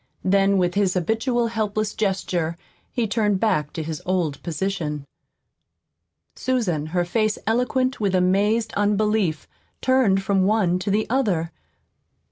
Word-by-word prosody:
Then, 195 +1 +3
with 180 -1 +1
his 200 -2 +1
habitual 225 - 0
helpless 215 -1 -1
gesture, 180 -5 -1 0.3
he 240 -2 0
turned 210 -2 +1
back 185 -9 +1
to 160 - -4
his 155 -1 -5
old 175 -6 -1
position. 160 -4 -3 1.3
Susan, 190 - -1
her 175 +2 0
face 215 +3 0
eloquent 250 +3 0
with 200 -3 +1
amazed 205 +5 +2
unbelief, 205 -5 +1 0.3
turned 245 -7 +3
from 195 -1 +2
one 195 -4 +2
to 190 - -3
the 210 +2 +1
other. 200 -11 0
200 Hz, 125 wpm, -23 LUFS, 180-220 Hz, 1.3 s, Then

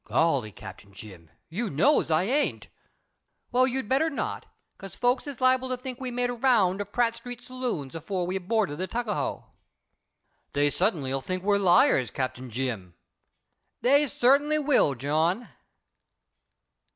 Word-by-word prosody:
"Golly, 140 -10 +1
Cap. - - -11
Jim, 95 -5 -12 0.2
you 205 +7 -3
knows 180 - +2
I 160 +2 +3
ain't." 275 +9 -1 0.8
"Well, 255 +1 +4
you'd 265 -3 -2
better 275 +7 +2
not, 280 - -4 0.3
because 195 -2 -10
folks 250 +3 +1
is 280 -3 -6
liable 255 0 +2
to 255 - -1
think 255 0 -7
we 255 - -3
made 245 0 -1
a - - -3
round 225 -7 +2
of 205 0 -7
Pratt 235 0 +1
street 245 0 -8
saloons 245 - -4
afore 175 +3 -3
we 180 +2 -3
boarded 190 -5 -1
the 185 - -2
Tuckahoe." 230 -2 -3 1.1
"Dey 145 0 +2
sutt'nly 145 -10 0
'll 135 - -1
think 185 +5 -4
we's 200 0 +2
liars, 175 -8 +4
Cap. 130 -1 -2
Jim." 120 -7 -5 0.9
"They 285 +4 +4
certainly 280 +5 +3
will, 275 - +2
John." 160 - 0
205 Hz, 150 wpm, -27 LUFS, -, 1.1 s, Well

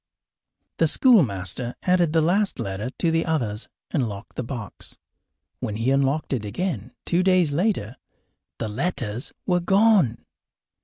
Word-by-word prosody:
The - - +3
schoolmaster 120 - +2
added 180 -3 +3
the 160 -1 +3
last 195 +5 +1
letter 105 +1 -3
to 170 - +1
the 165 0 +2
others 120 -10 -2 0.2
and 130 -8 0
locked 100 -1 -9
the - - -2
box. 115 -4 -7 0.6
When 105 - -3
he 115 +4 0
unlocked 140 +2 +1
it 120 -5 -1
again, 120 - -3
two 175 +1 +2
days 185 -4 +3
later, 145 - -1 0.6
the 115 - -3
letters 120 - -3
were 180 -1 +2
gone. 195 - +3
140 Hz, 140 wpm, -24 LUFS, 110-180 Hz, 0.6 s, The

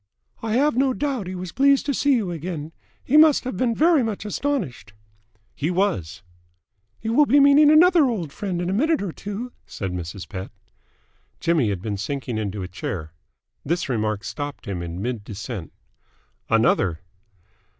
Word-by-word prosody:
"I 225 -1 -2
have 280 +2 +3
no 265 +1 +2
doubt 270 -9 -2
he 185 - -5
was 180 -1 -6
pleased 275 +1 +3
to 285 - 0
see 280 0 +3
you 205 -7 -1
again. 160 -2 -5 0.3
He 290 - +3
must 310 -2 +6
have 255 - -4
been 230 +3 0
very 320 +1 +4
much 220 -3 -3
astonished." 190 - -3 0.6
"He 150 - -2
was!" 175 - -1 0.8
"You 225 - -2
will 295 +3 +5
be 285 +4 +5
meeting 285 +1 +7
another 330 +1 +6
old 185 - -2
friend 185 -4 -3
in - - -2
a 185 - 0
minute 305 +5 +2
or 190 - -3
two," 205 +8 -6 0.2
said 95 -3 -5
Mrs. 90 +2 -6
Pett. 95 -3 -6 0.9
Jimmy 160 -9 +2
had 95 -2 -3
been 105 -2 -3
sinking 125 +1 -3
into 100 -2 -3
a - - -5
chair. 80 -3 -5 0.5
This 170 0 -1
remark 110 -4 -1
stopped 145 +7 -6
him 95 -5 -4
in 85 +2 -5
mid 120 -3 -3
descent. 105 - -7 0.8
"Another!" 85 -1 +2
175 Hz, 170 wpm, -23 LUFS, -, 0.9 s, meeting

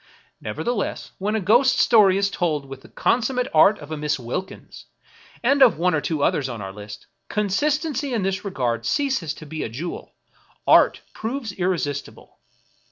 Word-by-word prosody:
Never - - -5
theless, 235 -4 -3
when 210 +3 -1
a - - +1
ghost 240 +7 +4
story 205 -5 +5
is 200 0 +1
told 155 -7 -1
with 135 0 -10
the - - -16
consummate 250 +1 0
art 195 +7 +6
of 145 +1 -11
a 155 - -3
Miss 150 0 -1
Wilkins, 125 +10 -7 0.6
and 275 +3 +3
of 255 - +6
one 180 +2 +1
or 155 - +1
two 155 -2 -2
others 135 -2 +1
on 120 -2 -6
our 95 -1 -7
list, 105 0 -10 0.2
consistency 285 - 0
in 225 -5 -1
this 190 0 -1
regard 125 - -2
ceases 265 - 0
to 155 - -11
be 155 +1 -6
a - - -3
jewel; 155 +10 -7 0.5
art - - +5
proves 230 0 -4
irresistible. 175 -7 -3
190 Hz, 170 wpm, -23 LUFS, 145-235 Hz, 0.6 s, art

